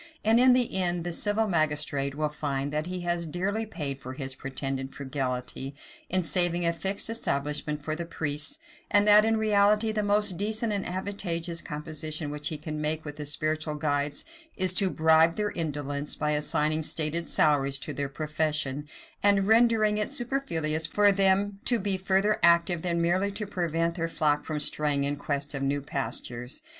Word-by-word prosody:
And, 225 Hz, +2 st, +5 dB
in 255 Hz, 0 st, +6 dB
the 245 Hz, -4 st, +1 dB
end, 175 Hz, -1 st, -1 dB
the 175 Hz, 0 st, -4 dB
civil 210 Hz, +4 st, +1 dB
magistrate 150 Hz, -5 st, 0 dB
will 150 Hz, 0 st, -1 dB
find, 145 Hz, -1 st, -3 dB
that 155 Hz, +2 st, -2 dB
he 180 Hz, 0 st, -4 dB
has 175 Hz, -1 st, -1 dB
dearly 200 Hz, +7 st, -2 dB
paid 145 Hz, -8 st, -4 dB
for 130 Hz, 0 st, -7 dB
his 135 Hz, 0 st, -4 dB
pretended 135 Hz, 0 st, -5 dB
frugality, 135 Hz, 0 st, -4 dB, 0.3 s
in 185 Hz, 0 st, +2 dB
saving 175 Hz, 0 st, +3 dB
a 170 Hz, -, +2 dB
fixed 195 Hz, +4 st, 0 dB
establishment 150 Hz, -8 st, -2 dB
for 155 Hz, -, -1 dB
the 170 Hz, +1 st, -5 dB
priests; 150 Hz, -, 0 dB, 0.3 s
and 205 Hz, 0 st, +4 dB
that 210 Hz, +1 st, +7 dB
in 225 Hz, 0 st, +2 dB
reality 210 Hz, 0 st, +3 dB
the 215 Hz, -1 st, -1 dB
most 205 Hz, -2 st, +2 dB
decent 220 Hz, +3 st, 0 dB
and 200 Hz, -1 st, -2 dB
advantageous 175 Hz, -3 st, -2 dB
composition 155 Hz, 0 st, -4 dB
which 150 Hz, 0 st, -4 dB
he 155 Hz, -, -2 dB
can 150 Hz, 0 st, -6 dB
make 155 Hz, +1 st, -1 dB
with 150 Hz, 0 st, -7 dB
the 150 Hz, -1 st, -5 dB
spiritual 155 Hz, +1 st, -1 dB
guides 145 Hz, -1 st, -1 dB, 0.3 s
is 185 Hz, -1 st, +4 dB
to 190 Hz, 0 st, +4 dB
bribe 160 Hz, 0 st, +4 dB
their 210 Hz, -1 st, -1 dB
indolence, 145 Hz, -3 st, -3 dB
by 150 Hz, -, -1 dB
assigning 150 Hz, +1 st, +1 dB
stated 160 Hz, +2 st, +1 dB
salaries 140 Hz, -3 st, +2 dB
to -, -, -3 dB
their 140 Hz, -1 st, -3 dB
profession, 150 Hz, -1 st, -2 dB, 0.3 s
and 200 Hz, -1 st, +3 dB
rendering 220 Hz, -2 st, +4 dB
it 210 Hz, -, -1 dB
superfluous 165 Hz, -, 0 dB
for 205 Hz, +2 st, +4 dB
them 195 Hz, +1 st, +2 dB
to 245 Hz, -, +3 dB
be 200 Hz, -2 st, 0 dB
further 195 Hz, +2 st, +1 dB
active 170 Hz, 0 st, +4 dB
than 170 Hz, -1 st, -1 dB
merely 185 Hz, +4 st, +1 dB
to 205 Hz, +1 st, -4 dB
prevent 170 Hz, -4 st, -1 dB
their 165 Hz, -2 st, -3 dB
flock 150 Hz, -2 st, 0 dB
from 155 Hz, -1 st, -3 dB
straying 145 Hz, -1 st, +1 dB
in 140 Hz, +1 st, 0 dB
quest 145 Hz, 0 st, -3 dB
of 135 Hz, -, -3 dB
new 140 Hz, +1 st, 0 dB
pastures. 125 Hz, -3 st, -4 dB
160 Hz, 175 wpm, -27 LUFS, 150-195 Hz, 0.3 s, that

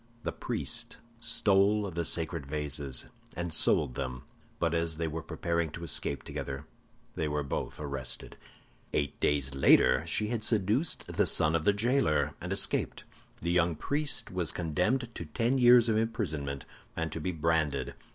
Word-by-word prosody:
The -, -, -1 dB
priest -, -, -1 dB, 0.2 s
stole 100 Hz, -2 st, +2 dB
the 85 Hz, 0 st, -2 dB
sacred 80 Hz, -2 st, -2 dB
vases, 70 Hz, -3 st, -1 dB, 0.3 s
and 85 Hz, -1 st, -2 dB
sold 65 Hz, -, +3 dB
them; 65 Hz, -1 st, -4 dB, 0.3 s
but 85 Hz, -1 st, 0 dB
as 85 Hz, -1 st, 0 dB
they 80 Hz, 0 st, -1 dB
were 80 Hz, +1 st, -4 dB
preparing 85 Hz, 0 st, -1 dB
to 85 Hz, -, -7 dB
escape 70 Hz, -3 st, -1 dB
together, 70 Hz, +2 st, -5 dB, 0.5 s
they 80 Hz, -, -2 dB
were 75 Hz, 0 st, -1 dB
both 70 Hz, -, -4 dB
arrested. 70 Hz, -4 st, -4 dB, 0.6 s
"Eight 70 Hz, -, -1 dB
days 70 Hz, -2 st, +1 dB
later 65 Hz, 0 st, +5 dB
she 105 Hz, +6 st, +1 dB
had 115 Hz, -2 st, -2 dB
seduced 110 Hz, -, +1 dB
the -, -, 0 dB
son 75 Hz, +1 st, +4 dB
of 80 Hz, -2 st, 0 dB
the 105 Hz, -, +5 dB
jailer, 110 Hz, -, +1 dB
and -, -, -5 dB
escaped. -, -, 0 dB, 0.4 s
The 85 Hz, -, 0 dB
young 85 Hz, -1 st, +2 dB
priest 145 Hz, -, -1 dB
was 90 Hz, -3 st, 0 dB
condemned 90 Hz, -, -1 dB
to 85 Hz, -, -6 dB
ten 115 Hz, -, 0 dB
years 120 Hz, -1 st, +7 dB
of 110 Hz, -1 st, +2 dB
imprisonment, 80 Hz, -, -2 dB, 0.3 s
and 80 Hz, -1 st, -2 dB
to 80 Hz, -, -4 dB
be 90 Hz, -, -1 dB
branded. 80 Hz, -5 st, 0 dB
80 Hz, 160 wpm, -30 LUFS, 75-105 Hz, 0.6 s, years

